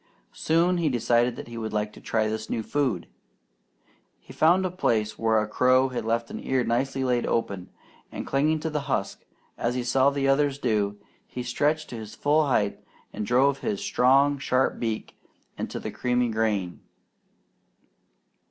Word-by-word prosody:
Soon 170 Hz, +3 st, +2 dB
he 165 Hz, -3 st, +1 dB
decided 120 Hz, -1 st, +2 dB
that -, -, -8 dB
he 120 Hz, -1 st, -7 dB
would 110 Hz, -1 st, -4 dB
like 105 Hz, 0 st, -1 dB
to -, -, -13 dB
try 110 Hz, -1 st, 0 dB
this 110 Hz, 0 st, -4 dB
new 110 Hz, -, -2 dB
food. 125 Hz, -9 st, -1 dB, 1.1 s
He -, -, -14 dB
found 180 Hz, +4 st, +4 dB
a 185 Hz, -, -1 dB
place 110 Hz, -, 0 dB
where 110 Hz, -1 st, +3 dB
a 105 Hz, -, -1 dB
crow 130 Hz, +4 st, +3 dB
had 120 Hz, -3 st, -4 dB
left 115 Hz, +1 st, -1 dB
an -, -, -6 dB
ear 130 Hz, -1 st, +1 dB
nicely 130 Hz, +3 st, -1 dB
laid 125 Hz, -2 st, +1 dB
open, 100 Hz, -5 st, -2 dB, 0.4 s
and -, -, -6 dB
clinging 150 Hz, +3 st, +1 dB
to 160 Hz, 0 st, -3 dB
the 150 Hz, -, -1 dB
husk, 100 Hz, -, -2 dB, 0.4 s
as 120 Hz, +1 st, 0 dB
he 125 Hz, -, -1 dB
saw 130 Hz, +2 st, +3 dB
the 140 Hz, -1 st, -1 dB
others 140 Hz, 0 st, +2 dB
do, 105 Hz, -6 st, 0 dB, 0.3 s
he 125 Hz, -, -6 dB
stretched 150 Hz, +5 st, 0 dB
to 120 Hz, -, -5 dB
his 110 Hz, -1 st, -8 dB
full 150 Hz, +1 st, +2 dB
height 105 Hz, -6 st, +1 dB, 0.3 s
and 105 Hz, -, -4 dB
drove 135 Hz, +3 st, +3 dB
his 210 Hz, -3 st, -2 dB
strong 140 Hz, -6 st, +3 dB
sharp 130 Hz, 0 st, +1 dB
beak 110 Hz, -2 st, -4 dB, 0.4 s
into -, -, -5 dB
the -, -, -5 dB
creamy 125 Hz, -1 st, 0 dB
grain. 105 Hz, -5 st, -1 dB
125 Hz, 170 wpm, -26 LUFS, 110-140 Hz, 1.1 s, found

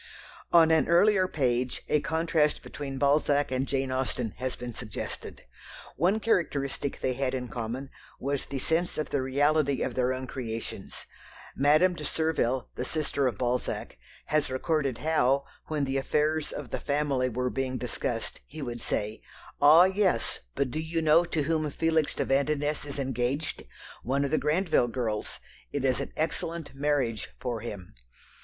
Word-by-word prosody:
On 165 Hz, -1 st, +7 dB
an 160 Hz, -1 st, +4 dB
earlier 185 Hz, +2 st, +5 dB
page 125 Hz, -6 st, 0 dB
a 150 Hz, -, +3 dB
contrast 160 Hz, -2 st, +1 dB
between 135 Hz, -2 st, -6 dB
Balzac 145 Hz, 0 st, +2 dB
and 130 Hz, +1 st, 0 dB
Jane 135 Hz, -1 st, -1 dB
Austen 130 Hz, -3 st, -1 dB
has 130 Hz, 0 st, -3 dB
been 120 Hz, -1 st, -6 dB
suggested. 105 Hz, -1 st, -6 dB, 0.5 s
One 185 Hz, +8 st, +2 dB
characteristic 145 Hz, -10 st, 0 dB
they 130 Hz, -, +1 dB
had 130 Hz, 0 st, -1 dB
in 125 Hz, -1 st, -3 dB
common 120 Hz, +4 st, -4 dB, 0.3 s
was 140 Hz, 0 st, -2 dB
the 140 Hz, -, -4 dB
sense 165 Hz, +6 st, 0 dB
of 155 Hz, -, -3 dB
the 140 Hz, -, +1 dB
reality 140 Hz, +1 st, +2 dB
of 130 Hz, -, -2 dB
their 125 Hz, 0 st, +1 dB
own 130 Hz, 0 st, -3 dB
creations. 115 Hz, -3 st, -6 dB, 0.5 s
Madame 155 Hz, +7 st, +4 dB
de 155 Hz, -, -7 dB
Surville, 145 Hz, -5 st, 0 dB
the -, -, -3 dB
sister 140 Hz, -1 st, 0 dB
of 120 Hz, -5 st, -2 dB
Balzac, 125 Hz, -, -2 dB, 0.3 s
has 155 Hz, -2 st, +1 dB
recorded 135 Hz, -1 st, 0 dB
how, 140 Hz, -3 st, +2 dB, 0.2 s
when 150 Hz, -2 st, 0 dB
the 135 Hz, 0 st, -1 dB
affairs 150 Hz, +3 st, +1 dB
of 140 Hz, -6 st, -7 dB
the -, -, -2 dB
family 140 Hz, -3 st, 0 dB
were 125 Hz, +1 st, -1 dB
being 130 Hz, -1 st, -2 dB
discussed, -, -, -3 dB
he 155 Hz, -, -7 dB
would 120 Hz, -2 st, -5 dB
say, 105 Hz, +1 st, -2 dB, 0.4 s
"Ah, 155 Hz, +4 st, +9 dB
yes, 190 Hz, -, +1 dB, 0.2 s
but 135 Hz, -3 st, 0 dB
do 155 Hz, -, -2 dB
you 160 Hz, +1 st, -1 dB
know 160 Hz, +3 st, +5 dB
to 160 Hz, -3 st, -1 dB
whom 155 Hz, 0 st, 0 dB
Felix 160 Hz, +1 st, +1 dB
de -, -, 0 dB
Vandenesse 145 Hz, +2 st, +1 dB
is 140 Hz, -1 st, -5 dB
engaged? 135 Hz, +2 st, -2 dB, 0.4 s
One 140 Hz, +4 st, 0 dB
of 140 Hz, -, -3 dB
the 155 Hz, -, +3 dB
Grandville 160 Hz, -5 st, +2 dB
girls. 115 Hz, -3 st, -3 dB, 0.3 s
It 140 Hz, -2 st, -1 dB
is 130 Hz, -2 st, +2 dB
an 140 Hz, -, -4 dB
excellent 165 Hz, 0 st, -2 dB
marriage 135 Hz, -6 st, 0 dB
for 120 Hz, -3 st, -2 dB
him." 100 Hz, -, -7 dB
140 Hz, 160 wpm, -28 LUFS, 130-155 Hz, 0.5 s, Ah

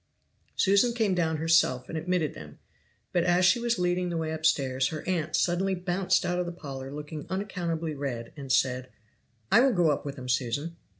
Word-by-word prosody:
Susan 200 Hz, +4 st, +3 dB
came 220 Hz, -5 st, +1 dB
down 165 Hz, -3 st, 0 dB
herself 155 Hz, -5 st, +2 dB
and -, -, -6 dB
admitted 160 Hz, -1 st, -1 dB
them: 75 Hz, -1 st, -11 dB, 0.6 s
but 175 Hz, -, +2 dB
as 180 Hz, +1 st, +3 dB
she 185 Hz, +6 st, +5 dB
was 235 Hz, -1 st, 0 dB
leading 180 Hz, 0 st, 0 dB
the 170 Hz, -, -2 dB
way 160 Hz, -1 st, -2 dB
upstairs 140 Hz, -5 st, +1 dB
her 155 Hz, +2 st, -6 dB
aunt 165 Hz, -4 st, -1 dB
suddenly 190 Hz, +2 st, +1 dB
bounced 180 Hz, 0 st, 0 dB
out 180 Hz, 0 st, 0 dB
of 180 Hz, -, -1 dB
the -, -, -3 dB
parlor 135 Hz, -5 st, -7 dB
looking 150 Hz, +1 st, -7 dB
unaccountably 175 Hz, -5 st, -3 dB
red, 130 Hz, -5 st, -5 dB
and 140 Hz, -3 st, -6 dB
said: 130 Hz, -1 st, +1 dB, 0.6 s
"I -, -, +7 dB
will 260 Hz, 0 st, +4 dB
go 175 Hz, -5 st, +3 dB
up -, -, -2 dB
with 140 Hz, -1 st, -5 dB
them, 130 Hz, -2 st, -8 dB
Susan." 130 Hz, +6 st, -1 dB
165 Hz, 190 wpm, -28 LUFS, 140-180 Hz, 0.6 s, I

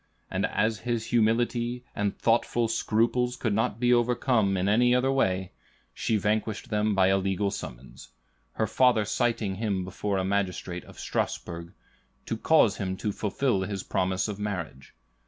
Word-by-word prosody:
And -, -, 0 dB
as 110 Hz, +1 st, 0 dB
his 120 Hz, -2 st, -2 dB
humility 120 Hz, +1 st, +1 dB
and 100 Hz, -1 st, -1 dB
thoughtful 115 Hz, 0 st, +2 dB
scruples 115 Hz, +2 st, +1 dB
could 110 Hz, -4 st, -1 dB
not 110 Hz, +1 st, 0 dB
be 125 Hz, 0 st, +4 dB
overcome 120 Hz, -4 st, +2 dB
in 90 Hz, +1 st, 0 dB
any 120 Hz, +4 st, +4 dB
other 130 Hz, +2 st, +2 dB
way, 95 Hz, -8 st, 0 dB, 0.4 s
she 110 Hz, -, 0 dB
vanquished 105 Hz, +2 st, -1 dB
them 105 Hz, 0 st, +1 dB
by 95 Hz, -1 st, +4 dB
a 95 Hz, 0 st, +3 dB
legal 95 Hz, +1 st, 0 dB
summons; 60 Hz, -5 st, -8 dB, 0.5 s
her -, -, 0 dB
father 125 Hz, -5 st, +3 dB
citing 110 Hz, -2 st, 0 dB
him 100 Hz, -4 st, -1 dB
before 95 Hz, +2 st, -2 dB
a 95 Hz, -, 0 dB
magistrate 95 Hz, -3 st, -2 dB
of -, -, -15 dB
Strasbourg, 85 Hz, -1 st, -3 dB, 0.5 s
to -, -, -2 dB
cause 115 Hz, -4 st, +3 dB
him 95 Hz, -1 st, -3 dB
to 105 Hz, -, -2 dB
fulfill 105 Hz, +1 st, 0 dB
his 95 Hz, 0 st, -3 dB
promise 95 Hz, +1 st, 0 dB
of 105 Hz, -1 st, -5 dB
marriage. 90 Hz, -10 st, -5 dB
105 Hz, 155 wpm, -27 LUFS, 95-120 Hz, 0.5 s, be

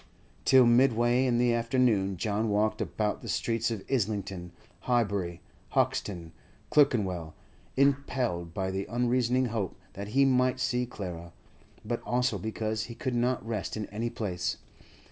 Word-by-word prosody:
Till 130 Hz, -2 st, +7 dB
midway 120 Hz, +1 st, +4 dB
in 120 Hz, -1 st, +2 dB
the 120 Hz, 0 st, +3 dB
afternoon 115 Hz, -5 st, +2 dB
John 110 Hz, +3 st, 0 dB
walked 105 Hz, +1 st, +1 dB
about 105 Hz, -1 st, -1 dB
the -, -, -7 dB
streets 115 Hz, 0 st, 0 dB
of 110 Hz, -4 st, -4 dB
Islington, 100 Hz, -7 st, -2 dB, 0.3 s
Highbury, 100 Hz, -8 st, 0 dB, 0.3 s
Hoxton, 85 Hz, -5 st, 0 dB, 0.4 s
Clerkenwell, 95 Hz, -, +2 dB, 0.4 s
impelled 130 Hz, -10 st, +1 dB
by 95 Hz, +2 st, -2 dB
the 95 Hz, +1 st, -3 dB
unreasoning 125 Hz, +2 st, +1 dB
hope 100 Hz, -5 st, -2 dB, 0.2 s
that 100 Hz, 0 st, -6 dB
he 140 Hz, -, +6 dB
might 130 Hz, -1 st, +2 dB
see 125 Hz, -1 st, 0 dB
Clara, 85 Hz, -6 st, -7 dB, 0.5 s
but 115 Hz, +2 st, -2 dB
also 125 Hz, -4 st, 0 dB
because 110 Hz, +1 st, -2 dB
he 115 Hz, -, -9 dB
could 130 Hz, -2 st, -3 dB
not 120 Hz, +1 st, 0 dB
rest 110 Hz, -2 st, -3 dB
in 105 Hz, -, -3 dB
any 115 Hz, +3 st, -2 dB
place. 90 Hz, -6 st, -3 dB
115 Hz, 140 wpm, -29 LUFS, 100-125 Hz, 0.5 s, Till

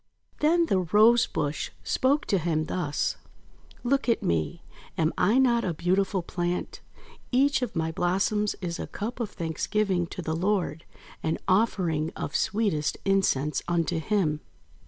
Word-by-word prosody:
Then 335 Hz, +3 st, +4 dB
the 195 Hz, -, +2 dB
Rose 215 Hz, +6 st, +5 dB
bush 145 Hz, 0 st, -2 dB
spoke 280 Hz, +3 st, +1 dB
to 195 Hz, -, +1 dB
him 155 Hz, -2 st, 0 dB
thus: 155 Hz, -3 st, -1 dB, 0.3 s
— 70 Hz, -, -30 dB, 0.3 s
"Look 270 Hz, +1 st, +1 dB
at 230 Hz, -, +2 dB
me. 80 Hz, -2 st, -1 dB, 0.3 s
Am 160 Hz, 0 st, +1 dB
I 205 Hz, +7 st, +3 dB
not 240 Hz, -3 st, +4 dB
a 175 Hz, -3 st, -1 dB
beautiful 185 Hz, +2 st, +1 dB
plant? 175 Hz, +1 st, -3 dB, 0.5 s
Each 275 Hz, +2 st, +3 dB
of 245 Hz, -6 st, -3 dB
my 160 Hz, -1 st, 0 dB
blossoms 195 Hz, +4 st, 0 dB
is 170 Hz, -2 st, -3 dB
a -, -, -4 dB
Cup 225 Hz, +5 st, -5 dB
of 230 Hz, -4 st, -2 dB
Thanksgiving 175 Hz, +2 st, -1 dB
to 180 Hz, +1 st, -7 dB
the 160 Hz, 0 st, -2 dB
Lord, 180 Hz, -3 st, -1 dB, 0.4 s
an 160 Hz, -, -1 dB
offering 185 Hz, -6 st, +1 dB
of 145 Hz, -, -5 dB
sweetest 200 Hz, -8 st, 0 dB
incense 170 Hz, -7 st, +1 dB
unto 170 Hz, -1 st, 0 dB
Him. 160 Hz, -4 st, 0 dB
185 Hz, 150 wpm, -27 LUFS, 160-215 Hz, 0.5 s, Rose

